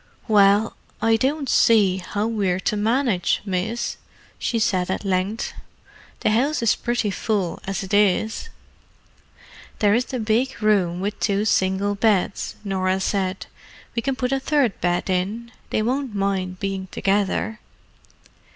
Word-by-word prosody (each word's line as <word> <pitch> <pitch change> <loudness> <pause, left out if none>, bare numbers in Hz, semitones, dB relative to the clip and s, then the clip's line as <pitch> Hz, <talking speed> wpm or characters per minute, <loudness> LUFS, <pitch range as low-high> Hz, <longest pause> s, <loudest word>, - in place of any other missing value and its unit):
"Well, 205 0 +4 0.2
I 225 0 +3
don't 275 +5 0
see 205 -6 +4
how 205 +3 -3
we're 200 -5 0
to 210 - 0
manage, 220 -3 +1
miss," 210 +5 -2 0.4
she 235 - -1
said 185 -5 +1
at 190 - -2
length. 195 +3 -1 0.7
"The - - +2
house 265 +5 +1
is 230 - +4
pretty 240 -3 -1
full 195 -3 -1
as 195 -1 -2
it 190 - -7
is." 210 - +2 1.3
"There 205 -1 +3
is 245 +3 +2
the 255 - -4
big 230 +4 0
room 190 -5 +2
with 205 +2 -3
two 205 0 +1
single 195 0 +1
beds," 200 -2 0
Norah 190 -1 0
said. 190 -1 -1 0.5
"We 230 - 0
can 270 +2 -1
put 250 0 -2
a 270 - +1
third 265 -6 +1
bed 175 0 0
in. 200 +6 -2 0.2
They 215 - 0
won't 255 -1 -1
mind 190 -2 -1
being 195 -1 -3
together." 200 +3 0
205 Hz, 140 wpm, -23 LUFS, 190-230 Hz, 1.3 s, Well